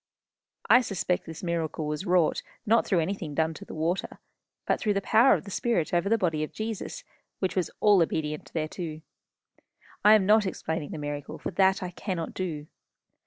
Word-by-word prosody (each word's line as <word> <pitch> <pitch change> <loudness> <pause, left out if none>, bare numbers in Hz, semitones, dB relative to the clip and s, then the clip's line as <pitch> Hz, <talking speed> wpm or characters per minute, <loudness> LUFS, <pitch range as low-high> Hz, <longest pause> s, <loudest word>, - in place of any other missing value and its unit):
I 250 - +7
suspect 190 -6 -2
this 160 +1 -8
miracle 165 -2 -2
was 150 +6 -3
wrought, 175 -3 +3 0.2
not 230 +1 +3
through 180 -5 +2
anything 165 -4 -3
done 160 +1 +1
to - - -10
the - - -9
water, 165 +4 -2 0.5
but - - +1
through 210 -3 0
the - - +2
power 235 +6 +5
of - - -4
the 200 - -9
spirit 185 -7 0
over 175 +3 +2
the 225 - +4
body 165 -6 0
of 155 - -5
Jesus, 220 - -5 0.3
which 190 - -2
was 180 -4 0
all 205 -3 +6
obedient 150 -2 -2
thereto. 160 0 -4 1.0
I 210 +1 +8
am 205 -3 +3
not 210 0 +4
explaining 160 -4 -3
the - - -6
miracle, 145 -1 -5
for - - -5
that 190 +2 +3
I 180 - -4
cannot 180 -2 -4
do. 160 -6 -4
180 Hz, 185 wpm, -27 LUFS, 160-200 Hz, 1.0 s, I